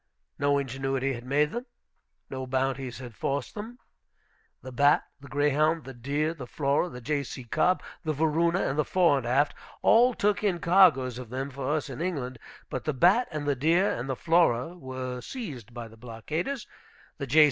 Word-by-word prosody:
No 145 0 +3
ingenuity 135 0 -1
had 120 -1 -7
made 145 +3 +2
them. 240 +3 -5 0.6
No 130 -1 -5
bounties 130 -1 -1
had 125 -2 -9
forced 135 +4 -2
them. 220 +4 -7 0.9
The 130 - -7
Bat, 145 +4 +4 0.2
the 140 - -12
Greyhound, 150 +3 +2
the 135 - -9
Deer, 145 +6 -1
the 135 -7 -8
Flora, 140 +6 0
the 125 -5 -9
J.C. 140 -1 -3
Cobb, 160 +9 +1 0.2
the 155 - 0
Varuna, 160 +4 +2
and 140 +3 -1
the - - +4
Fore 170 -6 +3
and 120 - -6
Aft 145 +4 +2 0.3
all 245 +2 +5
took 205 +1 +1
in 195 -4 +2
cargoes 165 -9 +4
of 125 -3 -8
them 135 +3 -4
for 140 +2 -1
us 155 - -2
in 135 +2 -6
England. 135 -8 -3 0.3
But 130 - -5
the 155 - 0
Bat 190 - +4
and 150 -3 -4
the 145 -1 +1
Deer 165 +9 +3
and 120 +3 -4
the 130 - 0
Flora 165 -1 +2
were 130 -5 -5
seized 145 - -7
by 120 -1 -7
the 110 0 -16
blockaders, 150 - -4 0.5
the 140 - -3
J. 155 - +4
140 Hz, 185 wpm, -28 LUFS, 130-165 Hz, 0.9 s, all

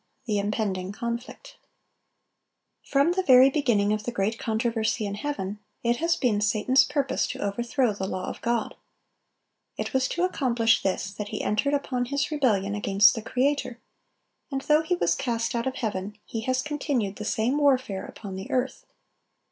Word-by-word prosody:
THE 210 -4 0
IMPENDING 200 -2 -2
CONFLICT. 235 - -6
[Illustration: - - -49
Chapter 275 - -3
header.] 280 - +6
From 340 - +3
the 375 - +2
very 260 +1 +8
beginning 220 -8 +2
of 215 0 -2
the 240 - -2
great 220 0 -1
controversy 225 -1 0
in 200 - -3
heaven, 205 -4 -4 0.2
it 235 0 +2
has 335 +3 +1
been 215 -5 +1
Satan's 215 +6 +4
purpose 285 -2 0
to - - -6
overthrow 235 +4 0
the 190 -1 -4
law 185 -1 -4
of - - -6
God. 235 -1 -1 1.0
It - - -4
was 265 0 +2
to 350 - -2
accomplish 240 -10 +2
this 195 0 -1
that 210 0 -5
he 210 0 -4
entered 280 +8 +1
upon 255 -3 -1
his 280 +4 -1
rebellion 210 -9 +1
against 205 0 +4
the 225 - -4
Creator; 255 +1 -1 0.7
and 270 -1 -2
though 300 +2 +3
he 320 +3 0
was - - +1
cast 230 -1 -1
out 235 +1 -1
of 260 - -2
heaven, 210 -3 -3
he 225 - -4
has 255 0 0
continued 280 -9 -2
the - - -5
same 230 +6 0
warfare 260 -9 +1
upon 200 -3 -9
the 190 +1 -7
earth. 255 +1 -2
235 Hz, 180 wpm, -26 LUFS, 210-270 Hz, 1.0 s, very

